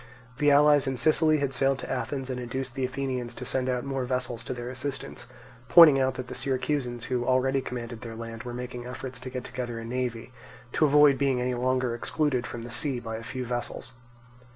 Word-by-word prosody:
The 145 - +4
allies 145 -1 +5
in 130 -1 -1
Sicily 155 +4 +4
had 140 -2 -1
sailed 135 +1 +2
to - - -6
Athens 135 0 -3
and 125 - -3
induced 125 +1 -4
the 135 0 -3
Athenians 130 -2 -3
to - - -7
send 130 -1 0
out 125 -1 -1
more 135 -1 -2
vessels 125 -2 -2
to - - -3
their 120 0 -5
assistance, 130 +2 -5 0.4
pointing 160 -5 +9
out 130 0 +1
that 130 - -5
the - - -8
Syracusans 130 -3 -1
who 125 -2 -1
already 130 +2 +2
commanded 120 -3 -6
their 115 -1 -7
land 115 0 -7
were 125 0 -6
making 125 0 -6
efforts 125 0 -6
to 130 - -7
get 125 -1 -5
together 125 -2 -5
a 115 - -6
navy, 125 0 -3 0.4
to 155 - +3
avoid 145 -1 +6
being 135 -3 +2
any 125 0 0
longer 125 0 0
excluded 130 +1 0
from 115 - -6
the 120 - -8
sea 135 +1 0
by 115 -2 -5
a - - -7
few 125 +2 -5
vessels. 120 +1 -4
125 Hz, 210 wpm, -27 LUFS, 120-135 Hz, 0.4 s, pointing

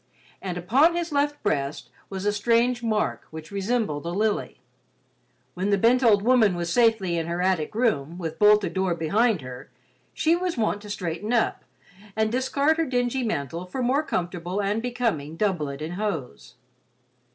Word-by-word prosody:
And 180 -2 -4
upon 270 - +3
his 340 -1 -2
left 290 0 0
breast 145 -8 -2 0.2
was 195 0 -5
a 205 - +2
strange 235 +3 +2
mark 220 -2 -1
which 160 +2 -9
resembled 200 -6 -1
a - - -1
lily. 210 +4 -1 0.9
When 185 +3 -2
the 200 - +3
bent 235 +5 +4
old 205 -4 +5
woman 225 -5 +4
was 170 -1 -2
safely 220 -7 +3
in 165 - -3
her 170 +1 -2
attic 185 -1 0
room, 175 - 0
with 160 -3 -5
bolted 210 -1 +5
door 190 -2 0
behind 200 +4 +1
her, 125 -1 -9 0.4
she 325 +1 +2
was 355 -2 -2
wont 215 -2 0
to 210 - -11
straighten 185 +1 -4
up, 235 -2 +1 0.5
and 220 0 +1
discard 280 +5 +1
her 330 - +1
dingy 245 0 0
mantle 170 - -3
for 255 +7 -3
more 260 +4 +2
comfortable 175 - -3
and 205 +2 0
becoming 230 -12 -2
doublet 155 -8 -1
and 160 +3 -5
hose. 195 -10 -4
205 Hz, 165 wpm, -25 LUFS, 175-240 Hz, 0.9 s, old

